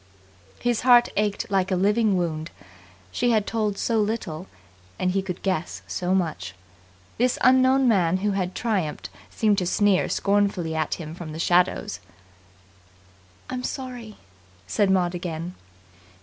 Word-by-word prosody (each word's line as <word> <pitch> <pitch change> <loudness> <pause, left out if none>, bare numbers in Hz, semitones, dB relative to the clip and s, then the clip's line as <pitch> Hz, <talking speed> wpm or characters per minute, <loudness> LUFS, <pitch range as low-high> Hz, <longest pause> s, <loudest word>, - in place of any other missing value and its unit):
His 240 -2 0
heart 245 -1 +6
ached 205 -1 -1
like 190 -1 +1
a 190 - +1
living 205 +2 +2
wound. 160 -2 -2 0.6
She 245 - 0
had 215 -3 +2
told 215 -3 -1
so 230 -2 0
little, 195 -5 -3 0.5
and 185 - 0
he 195 +1 0
could 185 -2 -6
guess 185 -4 -2
so 180 +1 -1
much. 160 - -2 0.6
This 250 +1 +2
unknown 260 +1 +5
man 185 -6 +3
who 205 +2 0
had 185 -2 -2
triumphed 195 -10 -2 0.2
seemed 210 -2 +1
to 180 - -2
sneer 200 0 +2
scornfully 200 -5 +1
at 160 -1 -1
him 160 -2 -8
from 165 -2 -8
the - - -6
shadows. 180 +4 +1 1.5
"I'm 255 -1 -4
sorry," 250 -5 -6 0.5
said 190 - +1
Maud 180 -2 +2
again. 170 0 -5
195 Hz, 140 wpm, -24 LUFS, 175-220 Hz, 1.5 s, heart